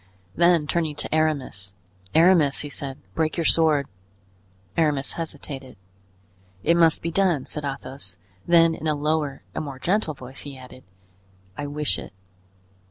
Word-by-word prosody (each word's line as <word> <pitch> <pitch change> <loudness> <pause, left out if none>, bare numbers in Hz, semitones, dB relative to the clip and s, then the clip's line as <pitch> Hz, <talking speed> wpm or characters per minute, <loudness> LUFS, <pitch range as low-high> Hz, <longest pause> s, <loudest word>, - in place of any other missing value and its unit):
Then 170 -2 +4
turning 155 -1 0
to - - -3
Aramis: 140 -12 -1 0.4
"Aramis," 160 -4 +5
he 145 - -5
said, 135 -1 -5 0.2
"break 160 +1 0
your 165 - 0
sword." 155 -4 +4 0.9
Aramis 145 -4 +1
hesitated. 140 -6 -6 0.9
"It 170 - +4
must 165 -2 +4
be 170 - -1
done," 175 -6 +2
said 150 - -5
Athos; 135 -8 -6 0.3
then 165 -1 +6
in 160 - -4
a 155 - +2
lower 150 -1 -1
and - - -3
more 140 -3 -6
gentle 175 +1 0
voice, 130 0 -9
he 140 -2 -7
added. 130 0 -13 0.7
"I 145 - -4
wish 150 +1 -1
it." - - -10
150 Hz, 145 wpm, -24 LUFS, 135-165 Hz, 0.9 s, then